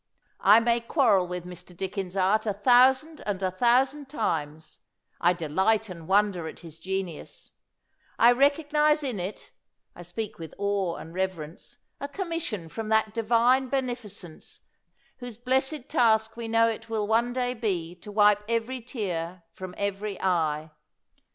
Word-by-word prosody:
I 210 Hz, +3 st, +7 dB
may 235 Hz, 0 st, +2 dB
quarrel 220 Hz, -, +3 dB
with 180 Hz, 0 st, -5 dB
Mr. 180 Hz, 0 st, -11 dB
Dickens's 190 Hz, 0 st, -4 dB
art 205 Hz, +4 st, +2 dB
a 205 Hz, -1 st, -2 dB
thou 250 Hz, +1 st, +8 dB
sand 305 Hz, +4 st, -10 dB
and 195 Hz, -2 st, -3 dB
a 185 Hz, -, +1 dB
thousand 260 Hz, +7 st, +2 dB
times 155 Hz, -, -3 dB, 0.2 s
— -, -, -39 dB
I 175 Hz, +1 st, +4 dB
delight 190 Hz, +7 st, 0 dB
and 170 Hz, -3 st, -9 dB
wonder 195 Hz, -4 st, +2 dB
at -, -, -9 dB
his 165 Hz, -2 st, -11 dB
genius; 185 Hz, -2 st, -5 dB, 0.7 s
I 235 Hz, +1 st, +7 dB
recognize 300 Hz, +3 st, +3 dB
in 250 Hz, -8 st, -3 dB
it— 185 Hz, +4 st, -6 dB, 0.4 s
I -, -, -10 dB
speak 205 Hz, +5 st, -6 dB
with 165 Hz, -1 st, -9 dB
awe 200 Hz, -3 st, -1 dB
and 165 Hz, -, -10 dB
reverence 180 Hz, -4 st, -4 dB
— -, -, -50 dB
a 280 Hz, -, -4 dB
commission 330 Hz, -, -4 dB
from 215 Hz, +6 st, -6 dB
that 220 Hz, -1 st, +2 dB
Divine 235 Hz, +3 st, +3 dB
Beneficence 240 Hz, -, -5 dB, 0.6 s
whose 245 Hz, -4 st, -8 dB
blessed 265 Hz, +3 st, -1 dB
task 220 Hz, -2 st, +2 dB
we 230 Hz, -1 st, -5 dB
know 230 Hz, 0 st, +4 dB
it 225 Hz, 0 st, -4 dB
will 220 Hz, -2 st, -1 dB
one 230 Hz, +2 st, +2 dB
day 250 Hz, 0 st, -1 dB
be 190 Hz, -8 st, -2 dB
to 205 Hz, +4 st, -11 dB
wipe 205 Hz, 0 st, +4 dB
every 230 Hz, +2 st, -1 dB
tear 185 Hz, -8 st, -4 dB
from 185 Hz, -1 st, -8 dB
every 200 Hz, 0 st, -3 dB
eye. 160 Hz, -4 st, 0 dB
210 Hz, 155 wpm, -27 LUFS, 180-245 Hz, 0.7 s, thou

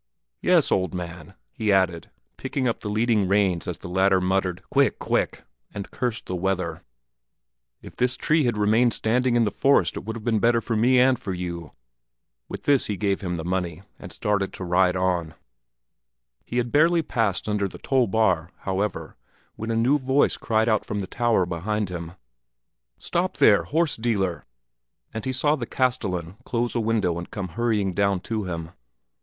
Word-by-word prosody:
"Yes, -, -, +3 dB
old 95 Hz, -1 st, +1 dB
man," 90 Hz, -1 st, -7 dB, 0.2 s
he 105 Hz, -, -1 dB
added, 95 Hz, -4 st, +1 dB, 0.3 s
picking 130 Hz, -3 st, -2 dB
up 115 Hz, -, -1 dB
the 105 Hz, -, -5 dB
leading 110 Hz, -1 st, +2 dB
reins 95 Hz, -3 st, +1 dB
as 90 Hz, -, -3 dB
the -, -, -9 dB
latter 95 Hz, +1 st, +3 dB
muttered 90 Hz, -1 st, -1 dB
"Quick, -, -, +3 dB
quick!" -, -, -1 dB, 0.3 s
and 100 Hz, -, -6 dB
cursed 120 Hz, -3 st, -3 dB
the 90 Hz, -, -4 dB
weather; 90 Hz, -3 st, -2 dB, 1.0 s
"if -, -, -11 dB
this 125 Hz, 0 st, 0 dB
tree 155 Hz, -2 st, +2 dB
had 120 Hz, -3 st, 0 dB
remained 110 Hz, +3 st, +3 dB
standing 125 Hz, +2 st, +1 dB
in 120 Hz, -, +4 dB
the 105 Hz, -, 0 dB
forest 140 Hz, +1 st, +2 dB
it -, -, -5 dB
would 110 Hz, -, -5 dB
have 115 Hz, -, -7 dB
been 110 Hz, -2 st, +1 dB
better 115 Hz, +2 st, +3 dB
for 115 Hz, 0 st, -3 dB
me 125 Hz, +4 st, +4 dB
and 130 Hz, -1 st, +4 dB
for 95 Hz, -3 st, -4 dB
you." 85 Hz, -3 st, -6 dB, 0.8 s
With -, -, -7 dB
this 140 Hz, -2 st, +3 dB
he 105 Hz, -, -2 dB
gave 100 Hz, -1 st, 0 dB
him 90 Hz, -2 st, -3 dB
the 80 Hz, -1 st, -5 dB
money, 90 Hz, -1 st, -2 dB, 0.2 s
and -, -, -9 dB
started 100 Hz, -2 st, -1 dB
to -, -, -7 dB
ride 90 Hz, +1 st, +2 dB
on. 90 Hz, -3 st, -1 dB, 1.1 s
He 120 Hz, -, -4 dB
had 120 Hz, -1 st, 0 dB
hardly 165 Hz, +2 st, +4 dB
passed 110 Hz, -10 st, -1 dB
under 105 Hz, -2 st, 0 dB
the -, -, -10 dB
toll 130 Hz, -3 st, +1 dB
bar, 95 Hz, -5 st, +1 dB
however, 100 Hz, +2 st, -3 dB, 0.4 s
when 110 Hz, -, -6 dB
a 115 Hz, -, 0 dB
new 125 Hz, +6 st, +3 dB
voice 135 Hz, +2 st, +2 dB
cried 110 Hz, -1 st, 0 dB
out 110 Hz, -2 st, +2 dB
from 105 Hz, -, -3 dB
the -, -, -3 dB
tower 115 Hz, -2 st, +1 dB
behind 95 Hz, +4 st, -2 dB
him, 85 Hz, -2 st, -6 dB, 0.8 s
"Stop -, -, -2 dB
there, -, -, +5 dB
horse 160 Hz, 0 st, 0 dB
dealer!" 100 Hz, -7 st, -1 dB, 0.7 s
and 110 Hz, -, -5 dB
he 130 Hz, -, 0 dB
saw 145 Hz, +4 st, +2 dB
the 120 Hz, -6 st, -5 dB
castellan 95 Hz, -9 st, -1 dB
close 120 Hz, -1 st, -1 dB
a 120 Hz, -, 0 dB
window 105 Hz, -7 st, 0 dB
and 85 Hz, -, -8 dB
come 95 Hz, -3 st, -5 dB
hurrying 105 Hz, -1 st, 0 dB
down 100 Hz, 0 st, +1 dB
to 110 Hz, 0 st, -3 dB
him. 85 Hz, -2 st, -5 dB
105 Hz, 185 wpm, -24 LUFS, 90-120 Hz, 1.1 s, there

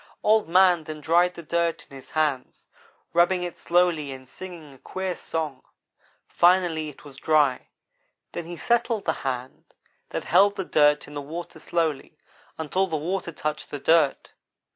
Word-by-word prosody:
"Old 215 Hz, -4 st, +3 dB
man 180 Hz, -2 st, +5 dB
then 155 Hz, 0 st, -7 dB
dried 175 Hz, +4 st, +2 dB
the 170 Hz, -, -9 dB
dirt 170 Hz, +1 st, -1 dB
in 140 Hz, -, -14 dB
his 135 Hz, -, -12 dB
hands, 150 Hz, -5 st, -1 dB, 0.5 s
rubbing 175 Hz, +1 st, +3 dB
it 175 Hz, -1 st, -5 dB
slowly 170 Hz, -5 st, +1 dB
and 130 Hz, -1 st, -10 dB
singing 165 Hz, -2 st, -10 dB
a 135 Hz, -, -18 dB
queer 190 Hz, -1 st, -4 dB
song. 155 Hz, -6 st, -4 dB, 0.7 s
Finally 175 Hz, -3 st, +3 dB
it 150 Hz, -, -15 dB
was 140 Hz, -2 st, -12 dB
dry; 145 Hz, -3 st, +2 dB, 0.6 s
then 170 Hz, -, -5 dB
he 175 Hz, 0 st, -7 dB
settled 235 Hz, -1 st, 0 dB
the 160 Hz, -, +1 dB
hand 130 Hz, -1 st, -5 dB, 0.3 s
that -, -, -4 dB
held 200 Hz, +1 st, +4 dB
the 190 Hz, -2 st, -3 dB
dirt 150 Hz, -2 st, +3 dB
in 145 Hz, -, -11 dB
the 145 Hz, -, -4 dB
water 165 Hz, +5 st, -7 dB
slowly, 160 Hz, -5 st, -2 dB, 0.4 s
until 180 Hz, +5 st, 0 dB
the 160 Hz, -3 st, -2 dB
water 170 Hz, +3 st, -3 dB
touched 150 Hz, -1 st, -4 dB
the 145 Hz, -, -4 dB
dirt. 160 Hz, -1 st, +2 dB
165 Hz, 165 wpm, -25 LUFS, 150-180 Hz, 0.7 s, man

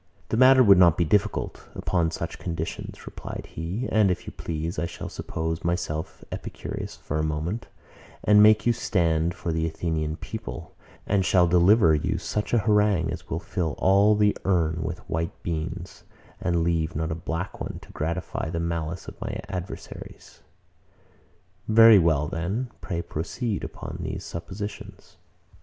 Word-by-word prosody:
The -, -, 0 dB
matter 130 Hz, +1 st, +7 dB
would 100 Hz, -5 st, +7 dB
not 85 Hz, -2 st, +6 dB
be 85 Hz, -, +2 dB
difficult, 105 Hz, +6 st, 0 dB
upon 85 Hz, -3 st, +1 dB
such 80 Hz, -, -5 dB
conditions, 85 Hz, -2 st, -5 dB
replied -, -, -7 dB
he: 90 Hz, +10 st, -3 dB
And 105 Hz, -3 st, +4 dB
if 90 Hz, -, -2 dB
you -, -, -7 dB
please, 80 Hz, +1 st, -4 dB
I 85 Hz, -, -1 dB
shall -, -, -7 dB
suppose 80 Hz, 0 st, -4 dB
myself 85 Hz, -2 st, -2 dB
Epicurus -, -, -6 dB
for 75 Hz, -, -4 dB
a -, -, +1 dB
moment, 80 Hz, +9 st, -2 dB, 0.6 s
and 105 Hz, 0 st, +6 dB
make 105 Hz, 0 st, +6 dB
you 120 Hz, -, +4 dB
stand 85 Hz, -6 st, +1 dB
for 90 Hz, -2 st, -3 dB
the 80 Hz, 0 st, 0 dB
Athenian 80 Hz, -1 st, -2 dB
people, -, -, -7 dB, 0.3 s
and 100 Hz, -1 st, +2 dB
shall 90 Hz, -1 st, +4 dB
deliver 90 Hz, +1 st, +5 dB
you 75 Hz, -, 0 dB
such 105 Hz, 0 st, -3 dB
an 120 Hz, -, +3 dB
harangue 105 Hz, -5 st, +3 dB
as -, -, -7 dB
will 80 Hz, -, -1 dB
fill 85 Hz, -4 st, -2 dB
all 100 Hz, +3 st, +5 dB
the 105 Hz, -1 st, +3 dB
urn 85 Hz, -4 st, +1 dB
with 80 Hz, +2 st, -5 dB
white 80 Hz, +1 st, -3 dB
beans, 85 Hz, +2 st, -4 dB, 0.4 s
and 85 Hz, -1 st, +1 dB
leave 85 Hz, -1 st, 0 dB
not 80 Hz, +1 st, -1 dB
a -, -, 0 dB
black 80 Hz, +2 st, -4 dB
one -, -, -4 dB
to -, -, -14 dB
gratify 85 Hz, +1 st, -3 dB
the 85 Hz, 0 st, -2 dB
malice 85 Hz, 0 st, -3 dB
of -, -, -10 dB
my -, -, -4 dB
adversaries. 90 Hz, 0 st, -8 dB, 1.3 s
Very 115 Hz, -1 st, +8 dB
well: 80 Hz, -4 st, +2 dB, 0.5 s
Pray 85 Hz, -4 st, -3 dB
proceed 100 Hz, +7 st, -3 dB
upon -, -, -6 dB
these -, -, -4 dB
suppositions. 100 Hz, +5 st, -7 dB
85 Hz, 155 wpm, -26 LUFS, 80-100 Hz, 1.3 s, Very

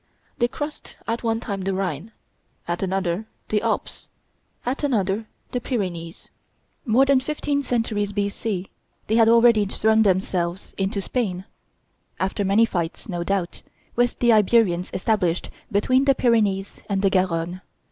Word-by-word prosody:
They 240 Hz, -, +3 dB
crossed 295 Hz, +4 st, -7 dB
at 230 Hz, +1 st, -1 dB
one 225 Hz, -1 st, 0 dB
time 200 Hz, -4 st, -4 dB
the 190 Hz, 0 st, -1 dB
Rhine, 185 Hz, +1 st, -3 dB, 0.6 s
at 175 Hz, +1 st, -2 dB
another 190 Hz, +1 st, -1 dB, 0.2 s
the 210 Hz, -1 st, +1 dB
Alps, 225 Hz, -1 st, -3 dB, 0.6 s
at 260 Hz, +4 st, -2 dB
another 215 Hz, -5 st, 0 dB, 0.2 s
the 245 Hz, -, -2 dB
Pyrenees. 180 Hz, -9 st, -4 dB, 0.6 s
More 245 Hz, +5 st, +5 dB
than 275 Hz, -1 st, +4 dB
fifteen 285 Hz, +1 st, -1 dB
centuries 225 Hz, -5 st, -1 dB
B.C. 200 Hz, -1 st, -2 dB, 0.3 s
they 220 Hz, -, 0 dB
had 225 Hz, -1 st, +6 dB
already 230 Hz, -3 st, +5 dB
thrown 220 Hz, +2 st, +2 dB
themselves 185 Hz, -2 st, 0 dB
into 195 Hz, 0 st, -1 dB
Spain, 190 Hz, -7 st, -2 dB, 0.7 s
after 190 Hz, +2 st, -1 dB
many 200 Hz, +4 st, +4 dB
fights, 175 Hz, -6 st, -3 dB
no 175 Hz, -2 st, -2 dB
doubt, 185 Hz, -1 st, -2 dB, 0.3 s
with 245 Hz, 0 st, +1 dB
the 240 Hz, -1 st, +4 dB
Iberians 210 Hz, -4 st, +3 dB
established 185 Hz, -4 st, 0 dB, 0.2 s
between 255 Hz, +6 st, +3 dB
the 275 Hz, -1 st, +4 dB
Pyrenees 210 Hz, -6 st, +1 dB
and 200 Hz, -1 st, 0 dB
the 195 Hz, -, +4 dB
Garonne. 180 Hz, -1 st, 0 dB
205 Hz, 140 wpm, -23 LUFS, 185-230 Hz, 0.7 s, had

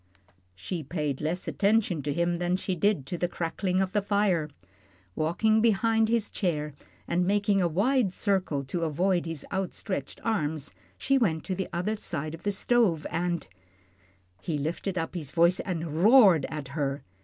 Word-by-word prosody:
She 165 Hz, -, -5 dB
paid 150 Hz, -2 st, -3 dB
less 165 Hz, +4 st, -2 dB
attention 200 Hz, -6 st, +1 dB
to 145 Hz, +1 st, -2 dB
him 170 Hz, +2 st, 0 dB
than 175 Hz, 0 st, +1 dB
she 190 Hz, -, -3 dB
did 180 Hz, -4 st, +1 dB
to 175 Hz, +4 st, -5 dB
the 175 Hz, -, +1 dB
crackling 180 Hz, +2 st, -1 dB
of 190 Hz, -1 st, -1 dB
the 205 Hz, +1 st, +1 dB
fire. 200 Hz, -6 st, +1 dB, 0.7 s
Walking 215 Hz, +8 st, +2 dB
behind 225 Hz, 0 st, +3 dB
his 230 Hz, -2 st, +1 dB
chair, 150 Hz, -6 st, -2 dB, 0.3 s
and 175 Hz, +1 st, +1 dB
making 200 Hz, +1 st, +2 dB
a 175 Hz, -, +3 dB
wide 205 Hz, -, +2 dB
circle 185 Hz, -8 st, 0 dB
to 140 Hz, +6 st, -4 dB
avoid 175 Hz, +3 st, +1 dB
his 165 Hz, -4 st, -5 dB
outstretched 190 Hz, -5 st, -3 dB
arms, 155 Hz, -9 st, -2 dB, 0.2 s
she 275 Hz, 0 st, +2 dB
went 160 Hz, -10 st, +1 dB
to 190 Hz, -, -3 dB
the 190 Hz, 0 st, -3 dB
other 180 Hz, +5 st, -1 dB
side 155 Hz, -7 st, -4 dB
of 165 Hz, -, -9 dB
the 205 Hz, -, 0 dB
stove 195 Hz, -6 st, +2 dB
and 175 Hz, +1 st, -1 dB, 0.9 s
He 155 Hz, +5 st, -2 dB
lifted 170 Hz, +6 st, -3 dB
up 165 Hz, -1 st, -2 dB
his 160 Hz, -6 st, -3 dB
voice 170 Hz, +4 st, +3 dB
and 165 Hz, -3 st, -3 dB
roared 205 Hz, -, +7 dB
at 150 Hz, -3 st, -6 dB
her. 140 Hz, -1 st, -2 dB
175 Hz, 165 wpm, -28 LUFS, 160-200 Hz, 0.9 s, roared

